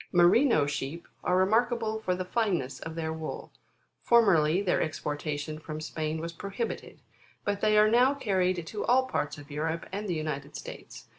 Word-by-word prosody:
Merino 175 - +5
sheep, 145 +3 -4 0.2
are 180 - +2
remarkable 220 +3 +2
for 185 -4 -1
the 185 0 -4
fineness 180 - -1
of 160 0 -7
their 160 -1 -2
wool. 160 -1 -6 0.5
Formerly, 185 -8 +4
their 185 - +2
exportation 150 0 -3
from 155 -1 -6
Spain 155 0 -3
was 165 +1 -5
prohibited; 200 +6 -5 0.5
but 205 -1 -1
they 215 0 +4
are 210 0 +7
now 250 +5 +4
carried 185 -8 0
to 210 +4 -4
all 260 +2 +4
parts 155 - -2
of 145 0 -12
Europe, 160 +3 -2
and 205 +2 -4
the 175 - 0
United 150 -2 -4
States. - - -9
175 Hz, 165 wpm, -29 LUFS, 155-215 Hz, 0.5 s, are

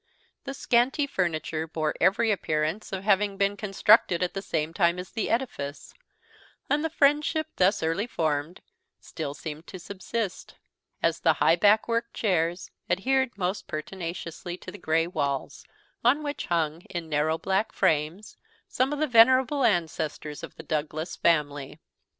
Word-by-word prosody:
The 275 -1 -5
scanty 255 +4 +2
furniture 165 - -2
bore 155 -1 -1
every 225 +3 +3
appearance 160 0 -1
of 190 0 -4
having 200 0 +2
been 200 +1 +1
constructed 200 -3 +3
at 180 - -2
the 195 - -3
same 160 -4 -2
time 170 -1 +2
as 180 0 -7
the 225 - -2
edifice; 225 - -3 0.8
and 295 +1 +2
the 320 - 0
friendship 300 +1 +2
thus 190 +1 +3
early 165 +8 0
formed 155 -4 -2 0.4
still 140 - -6
seemed 150 +4 -7
to 190 - -8
subsist, 200 +2 -5 0.5
as - - +2
the - - +4
high 165 - +4
backed 210 +4 +4
worked 230 0 -1
chairs 175 -3 0 0.2
adhered 260 +6 +1
most 190 +1 -2
pertinaciously 170 +1 -5
to 185 - -9
the 205 - -11
gray 165 0 +1
walls, 140 -6 -3 0.4
on 270 +6 +3
which 290 0 -4
hung, 165 -2 0
in 170 -2 -5
narrow 155 +1 +1
black 195 +5 0
frames, 160 +7 0 0.3
some 260 +2 0
of 295 - -2
the 310 - +1
venerable 260 +2 +5
ancestors 160 -6 -1
of - - -9
the - - -10
Douglas 155 +2 -3
family. 145 -3 0
185 Hz, 150 wpm, -27 LUFS, 160-230 Hz, 0.8 s, venerable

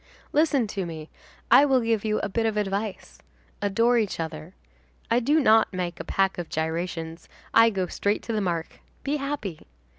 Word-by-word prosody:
Listen 290 -5 +3
to 200 -2 -4
me; 160 -2 -8 0.4
I - - +8
will 265 -3 +3
give 225 -2 0
you 215 -1 0
a - - -1
bit 225 +3 0
of 215 -1 -1
advice: 205 0 -3 0.4
Adore 230 +4 +3
each 210 -6 -2
other. 160 +2 -6 0.6
I 235 - +4
do 290 +6 +3
not 220 -5 +4
make 180 -2 -4
a - - -4
pack 195 -1 0
of 170 - -5
gyrations, 165 +1 -4 0.2
I 230 0 +7
go 190 -4 -1
straight 200 +3 -1
to 230 - -4
the 215 - 0
mark, 170 -4 -3 0.2
be 290 +2 0
happy. 275 - -5
205 Hz, 180 wpm, -25 LUFS, 175-230 Hz, 0.6 s, I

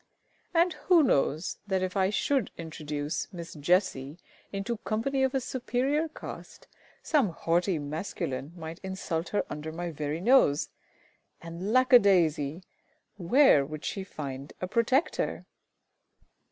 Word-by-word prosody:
"] - - -38
And 340 +1 +4 0.2
who 345 -4 +7
knows 155 - +1
that 190 -2 0
if 185 +1 -3
I 190 -1 +3
should 255 +4 0
introduce 150 -2 -4
Miss 170 -1 -8
JESSIE 150 -3 0 0.3
into 200 +4 -3
company 235 +7 -1
of 265 +1 +1
a - - +3
superior 260 +5 -1
caste, - - -10 0.4
some 285 - +2
haughty 170 +2 0
masculine 150 -1 -4
might 160 0 -7
insult 190 -3 -4
her 205 - 0
under 150 +1 -6
my 170 +1 -4
very 150 +1 -3
nose; 190 - +4 0.7
and 170 +5 -5
lack 255 +1 +3
a 245 - +11
daisy! 165 -5 +2 0.5
where 190 - +5
would 155 +2 -7
she 195 - -3
find 140 -6 -7
a 185 - -3
protector? 245 - 0
185 Hz, 135 wpm, -28 LUFS, 155-240 Hz, 0.7 s, a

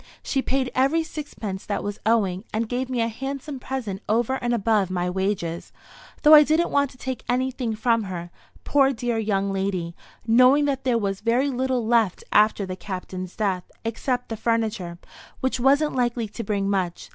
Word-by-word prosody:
She 270 - 0
paid 260 -1 -1
every 275 +6 +2
sixpence 225 - -6
that 200 -1 -2
was 205 0 -4
owing, 200 -5 +2
and 220 +1 -1
gave 250 +2 -2
me 250 -2 0
a 230 - +2
handsome 270 +4 -5
present 240 -7 -4
over 235 +4 +2
and 240 -1 -2
above 215 -4 +2
my 180 -1 -1
wages; 190 -3 -2 0.5
though 300 - +8
I 300 - +11
didn't 315 +3 +2
want 280 -1 +2
to 255 - -17
take 260 -2 -5
anything 250 -2 -1
from 230 0 +1
her, 175 -2 -6 0.3
poor 275 -1 +3
dear 240 -1 -1
young 200 -2 0
lady, 190 -3 -2 0.3
knowing 255 +5 +5
that 270 -2 -1
there 250 -2 +3
was 195 -3 -2
very 240 +5 +2
little 255 -2 -1
left 225 -5 +2
after 210 -1 +4
the 185 -1 -5
Captain's 185 -1 -6
death, 195 -4 -1 0.2
except 245 +2 -2
the 225 - -4
furniture, 220 -6 -1 0.4
which 260 -1 -1
wasn't 285 +4 +3
likely 240 -2 0
to 230 +3 -6
bring 200 -1 -1
much. 185 -3 -2
230 Hz, 180 wpm, -24 LUFS, 195-260 Hz, 0.5 s, I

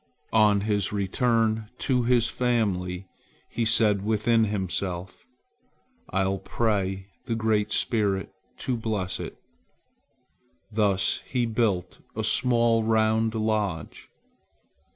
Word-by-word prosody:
On 105 -2 +4
his 105 -2 0
return 110 +2 0
to 125 -3 +1
his 120 -1 +3
family, 100 -7 -1 0.5
he 115 - -1
said 110 -3 +3
within 110 +1 +2
himself: 95 -2 -4 0.8
"I'll 95 0 0
pray 95 -2 -1 0.2
the 115 - -1
Great 110 -2 +1
Spirit 100 -4 0 0.3
to 130 - 0
bless 105 -5 -2
it." - - -7 1.3
Thus 100 -3 +1
he 125 -2 0
built 110 -6 -1 0.2
a 110 - -2
small 115 0 +3
round 110 0 +2
lodge. 105 -7 -2
110 Hz, 100 wpm, -26 LUFS, 95-115 Hz, 1.3 s, On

